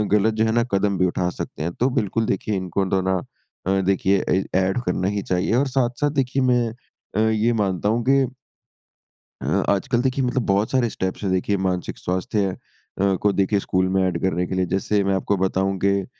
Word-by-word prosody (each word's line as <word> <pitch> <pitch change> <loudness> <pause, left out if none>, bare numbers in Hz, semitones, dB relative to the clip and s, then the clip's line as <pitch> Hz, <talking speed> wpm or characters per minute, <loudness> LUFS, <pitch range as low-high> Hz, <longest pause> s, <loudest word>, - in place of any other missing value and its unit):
गलत 110 +2 +3
जो - - +4
है 110 - +1
ना - - +3
कदम 100 0 +2
भी 90 - +3
उठा 90 -1 0
सकते 75 - -5
हैं। 85 - -2
तो 125 +8 +1
बिल्कुल 110 +2 -1
देखिए 100 +2 -2
इनको 95 +1 -1
तो 95 - +2
ना 95 - +2 0.5
अ, 95 +1 +2
देखिए 95 0 +2
ए 95 +1 +2
एड 95 +5 +1
करना 95 - 0
ही 100 - 0
चाहिए 90 +4 +1
और 140 +3 +2
साथ-साथ 130 +2 0
देखिए 130 +1 -1
मैं 120 -1 +2 0.5
अ, 110 +1 +3
ये 110 +2 +2
मानता 95 +1 -1
हूँ 120 - -1
कि 135 0 +4 1.2
अ, - - -5 0.2
आजकल 120 +5 +1
देखिए 130 +1 0
मतलब 125 0 0
बहुत 100 +2 +1
सारे 125 -3 +2
स्टेप्स 95 -1 -4
है 100 - 0
देखिए 95 +2 +1
मानसिक 95 -2 -2
स्वास्थ्य 100 +3 -1 0.5
अ, 100 -1 +3
को 105 - +3
देखिए 100 +1 +1
स्कूल 95 -1 0
में 95 - +3
एड 85 -2 -2
करने 90 -1 0
के 95 - -3
लिए। 95 0 +1
जैसे 95 +3 0
मैं 95 0 +1
आपको 95 +1 0
बताऊँ 95 +1 0
के 100 +1 +2
अ, - - -8
100 Hz, 210 wpm, -22 LUFS, 95-115 Hz, 1.2 s, जो